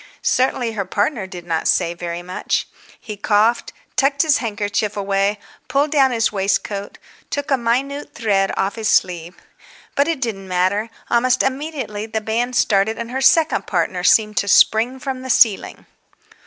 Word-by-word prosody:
Certainly 255 -2 +1
her 210 -3 -3
partner 205 +1 -1
did 180 -2 -9
not 165 -2 -1
say 170 - +2
very 175 0 -6
much. 180 +1 -2 0.3
He 215 -3 -7
coughed, 215 +3 +1 0.2
tucked 280 +2 +2
his 310 -3 +3
handkerchief 210 -2 -2
away, 200 +1 0 0.3
pulled 285 +2 +1
down 275 -3 +4
his 230 -3 0
waistcoat, 200 0 -2 0.3
took 285 0 -4
a - - +5
minute 265 +4 -2
thread 195 -4 +1
off 195 +1 0
his 220 -1 -1
sleeve. 175 -1 0 0.6
But 280 - +2
it 330 -4 -1
didn't 210 -7 -4
matter. 185 +4 0 0.2
Almost 250 +1 +3
immediately 265 -6 -3
the 220 0 -2
band 235 +3 -2
started 220 -1 +2
and 235 0 -6
her 265 +1 -2
second 320 +4 +3
partner 180 0 -1
seemed 215 +2 +3
to 200 - +1
spring 225 +6 +4
from 260 -1 -5
the 260 - -8
ceiling. 225 -4 +2
220 Hz, 160 wpm, -20 LUFS, 195-255 Hz, 0.6 s, a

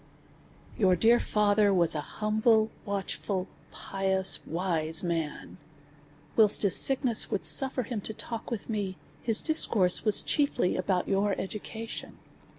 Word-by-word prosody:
Your 190 -4 +3
dear 230 +6 +3
father 210 -1 +1
was 175 -4 +2
an 150 - -3
humble, 220 +4 0
watchful, 195 -1 -4 0.2
pious, 190 -1 0
wise 165 -2 -2
man. 165 -3 -5 0.8
Whilst 215 -2 +5
his 195 -4 +4
sickness 260 -4 +3
would 200 - -2
suffer 265 -1 +4
him 225 -2 -5
to 220 - -7
talk 230 +1 -7
with 230 -4 -6
me, 200 -4 -4 0.2
his 225 -3 +3
discourse 215 - +2
was 215 -2 +3
chiefly 285 - 0
about 185 -1 -2
your 200 +1 -1
education. 220 +3 -8
205 Hz, 130 wpm, -27 LUFS, 185-225 Hz, 0.8 s, Whilst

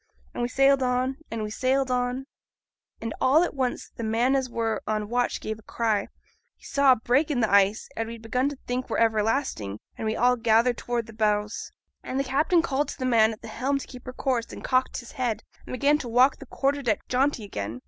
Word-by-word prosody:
And - - -4
we 240 - 0
sailed 275 +1 +4
on, 255 +1 0
and 225 -1 -3
we 210 - -4
sailed 260 +3 +1
on. 250 +1 -1 1.0
All 295 +6 +5
at 355 - -2
once, 260 -3 -2
th' - - -6
man 235 +4 +2
as 265 -2 0
were 225 -2 -1
on 215 -1 -1
watch 245 +1 0
gave 220 0 -5
a - - -14
cry: 220 -1 -1 0.5
he - - -20
saw 280 -2 +5
a - - +1
break 250 +7 +1
in 280 -5 0
the 220 - +1
ice, 200 +1 +4
as 225 0 -2
we'd 230 0 -8
begun 250 +4 0
to 285 - -8
think 250 +1 -3
were - - -1
everlasting; 220 - 0 0.2
and 220 - -2
we 220 - 0
all 250 +1 +3
gathered 230 +1 +3
towards 240 -1 -2
the 225 - -12
bows, 210 -1 -1 0.3
and 260 - -3
the - - +2
captain 305 +6 +2
called 290 -2 0
to - - -7
th' 255 - -3
man 225 -3 +4
at 215 - -10
the - - -7
helm 260 +6 -1
to 275 - -6
keep 250 -1 -12
her 255 - -5
course, 250 -4 -1
and - - -9
cocked 255 0 +1
his 240 - -12
head, 235 -4 -2 0.2
and - - -6
began 285 +4 +3
to 245 - -5
walk 250 +4 +4
the 275 - -12
quarter 280 +3 0
deck 225 -6 -1
jaunty 260 -2 +1
again. 110 - -5
245 Hz, 230 wpm, -26 LUFS, 220-265 Hz, 1.0 s, All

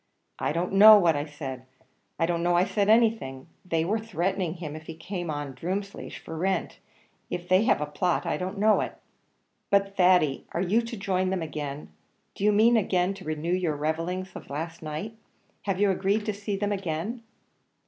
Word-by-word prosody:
"I - - 0
don't 170 +4 -2
know 210 +2 +10
what 170 -5 +3
I 145 0 -2
said 135 -4 -7 0.5
I 165 - +2
don't 170 0 -1
know 175 0 +2
I 175 - +5
said 205 0 0
anything; 220 - +2 0.2
they 165 -3 0
were 215 +5 0
threatening 190 -4 -2
him, 155 -4 -6
if 155 0 -10
he 165 - -7
came 175 +1 -5
on 145 -2 -4
Drumleesh 190 +8 -5
for 160 - -9
rent; 185 +1 -1 0.5
if 175 0 -4
they 185 +4 +4
have 230 - +3
a - - 0
plot, 170 +4 -1
I - - 0
don't 185 +2 -4
know 215 +1 +4
it." - - -5 0.7
"But, 200 -1 +2
Thady, 180 -7 +3
are 170 - -1
you 205 +6 +2
to 230 0 -6
join 190 -2 0
them 185 -3 -1
again? 150 -2 -5 0.4
do - - -7
you 210 - +5
mean 225 +3 +5
again 185 -2 +1
to 195 -1 -11
renew 155 +2 -2
your 175 -4 0
revellings 165 +5 -2
of - - -10
last 165 +4 -5
night? 160 +9 -5 0.5
have 195 -2 -1
you 205 -1 +4
agreed 200 +3 0
to 215 - -1
see 200 0 -4
them 205 +1 -1
again?" 195 +4 -3
180 Hz, 195 wpm, -27 LUFS, 160-200 Hz, 0.7 s, know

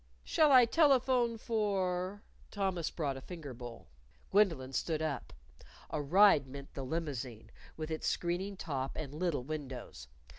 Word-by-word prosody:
"Shall 310 -2 +4
I 255 -2 +9
telephone 255 -4 +3
for 200 -3 -1
?" - - -30
Thomas 190 -5 -1
brought 140 -5 -2
a - - -8
finger 155 -4 -8
bowl. 120 -1 -9 0.5
Gwendolyn 165 -11 +3
stood 155 +4 0
up. 155 -5 -3 0.6
A 155 - -1
ride 160 -1 +5
meant 140 +1 -9
the 135 - -5
limousine, 135 -6 -4 0.3
with 155 0 -4
its 160 - -2
screening 185 +3 -1
top 135 -6 -3
and 145 -3 -5
little 160 -4 -1
windows. 130 - -6
160 Hz, 145 wpm, -33 LUFS, 135-200 Hz, 0.6 s, I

